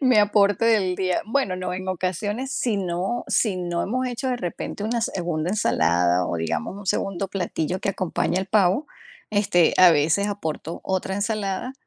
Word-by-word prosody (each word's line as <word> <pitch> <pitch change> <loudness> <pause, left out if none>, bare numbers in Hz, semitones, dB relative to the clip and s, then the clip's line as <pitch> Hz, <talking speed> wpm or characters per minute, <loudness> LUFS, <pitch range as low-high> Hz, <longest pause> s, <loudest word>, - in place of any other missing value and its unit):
Mi 255 -4 +4
aporte 205 0 +3
del 195 -5 +3
día, 185 -1 0
bueno 225 -5 0
no, 185 - -3
en 185 +1 -5
ocasiones 205 +8 -2
si 235 -6 0
no 185 +5 -2
si 205 -5 +2
no 175 -1 -2
hemos 255 +4 -1
hecho 250 +1 -3
de 250 - 0
repente 195 +1 -5
una 235 +2 0
segunda 175 -6 -2
ensalada 90 - +2
o - - -2
digamos 80 - -3
un 205 - -10
segundo 195 0 -1
platillo 180 -1 -2
que - - -3
acompañe 185 -1 -1
al 190 - -3
pavo, 200 +7 +2 0.4
este, 205 -5 +3
a 180 -1 +9
veces 160 +7 +2
aporto 165 -4 -4
otra 190 0 -1
ensalada, 205 +2 -2
190 Hz, 170 wpm, -24 LUFS, 175-215 Hz, 0.4 s, a